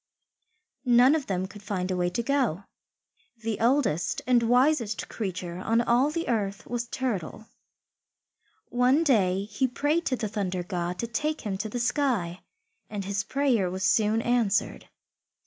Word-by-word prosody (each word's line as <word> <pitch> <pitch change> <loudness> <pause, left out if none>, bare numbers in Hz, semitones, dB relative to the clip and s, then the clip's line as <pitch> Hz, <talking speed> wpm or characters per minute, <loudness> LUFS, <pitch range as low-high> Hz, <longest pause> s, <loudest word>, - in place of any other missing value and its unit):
None 245 +3 +6
of 310 -4 -1
them 185 -1 -1
could 205 +1 -12
find 190 -3 -3
a - - 0
way 180 0 +1
to 235 +7 -2
go. 245 - 0 0.7
The 225 -1 -3
oldest 230 - +1
and 250 -2 +4
wisest 245 -1 +2
creature 185 -4 -4
on 225 +5 +1
all 240 +4 +3
the 330 +2 -3
earth 205 -4 -1
was 240 -1 -3
Turtle. 220 -6 -3 1.2
One 250 +6 +3
day 195 - +2
he 210 +5 -1
prayed 290 +6 0
to 260 - +1
the 230 -3 -3
Thunder 190 -4 -2
God 175 -1 -3
to 235 - -2
take 300 +7 -2
him 205 -4 -3
to 215 +1 -3
the 245 - -4
sky, 235 - 0 0.5
and 205 -2 -4
his 200 0 -1
prayer 245 -6 +1
was 185 +1 -4
soon 210 +3 +2
answered. 235 -5 0
225 Hz, 155 wpm, -27 LUFS, 195-250 Hz, 1.2 s, None